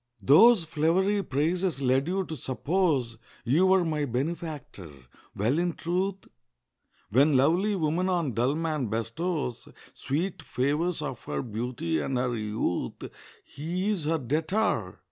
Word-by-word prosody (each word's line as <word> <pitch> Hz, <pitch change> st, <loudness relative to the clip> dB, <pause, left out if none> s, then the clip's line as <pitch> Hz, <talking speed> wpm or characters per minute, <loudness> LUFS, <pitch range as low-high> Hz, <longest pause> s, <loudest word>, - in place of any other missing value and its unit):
Those 195 Hz, -, +7 dB
flowery 170 Hz, +6 st, +1 dB
praises 165 Hz, +1 st, -1 dB
led 135 Hz, +2 st, +2 dB
you 190 Hz, +1 st, -1 dB
to 160 Hz, -, -6 dB
suppose 135 Hz, -2 st, 0 dB, 0.3 s
You 155 Hz, +10 st, +3 dB
were 190 Hz, -1 st, +4 dB
my 155 Hz, -2 st, -1 dB
benefactor. 140 Hz, -, -4 dB, 0.5 s
Well, 120 Hz, +10 st, +1 dB
in 175 Hz, -1 st, 0 dB
truth, 185 Hz, +4 st, -2 dB, 0.8 s
When 140 Hz, +5 st, +4 dB
lovely 175 Hz, +10 st, +3 dB
woman 175 Hz, +2 st, 0 dB
on 170 Hz, -8 st, 0 dB
dull 125 Hz, +6 st, +1 dB
man 155 Hz, -5 st, -1 dB
bestows 120 Hz, -, -3 dB, 0.3 s
Sweet 160 Hz, +5 st, -3 dB
favours 150 Hz, +4 st, -1 dB
of 130 Hz, -5 st, -5 dB
her 70 Hz, -1 st, -3 dB
beauty 110 Hz, -8 st, -2 dB
and 130 Hz, -, -2 dB
her 125 Hz, -1 st, 0 dB
youth, 105 Hz, -4 st, -3 dB, 0.3 s
He 175 Hz, +7 st, -3 dB
is 180 Hz, -8 st, -2 dB
her 165 Hz, +2 st, +1 dB
debtor. 155 Hz, -, -1 dB
155 Hz, 130 wpm, -27 LUFS, 125-175 Hz, 0.8 s, Those